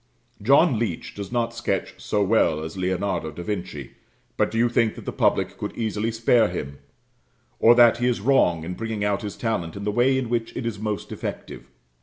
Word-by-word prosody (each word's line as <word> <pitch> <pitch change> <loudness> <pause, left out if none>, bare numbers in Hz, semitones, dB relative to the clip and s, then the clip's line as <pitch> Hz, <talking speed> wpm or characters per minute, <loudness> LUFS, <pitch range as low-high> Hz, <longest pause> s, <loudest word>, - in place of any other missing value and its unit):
John 135 - +4
Leech 105 -8 -3
does 100 -2 -7
not 120 -1 -1
sketch 115 -5 -2
so 105 -1 0
well 95 -7 +2
as 80 +2 -6
Leonardo 95 -2 -1
da 85 - -8
Vinci; 90 - -5 0.4
but - - +1
do 115 - -4
you 120 +1 +4
think 115 -2 +1
that - - -10
the - - -3
public - - +1
could - - -5
easily 110 0 -1
spare 115 0 +3
him; 70 -6 -6 0.8
or 120 +1 +7
that 120 -1 +6
he 120 - +1
is 125 -2 +1
wrong 100 -9 +2
in 90 +3 -4
bringing 110 +1 -4
out 100 +1 0
his 105 -2 -6
talent 90 -8 -2
in 100 - -6
the 105 - 0
way 125 +5 +3
in 130 -2 -2
which 115 -1 -2
it 120 - -4
is 110 -3 -3
most 105 -1 -4
effective? - - -7
105 Hz, 205 wpm, -24 LUFS, 95-115 Hz, 0.8 s, or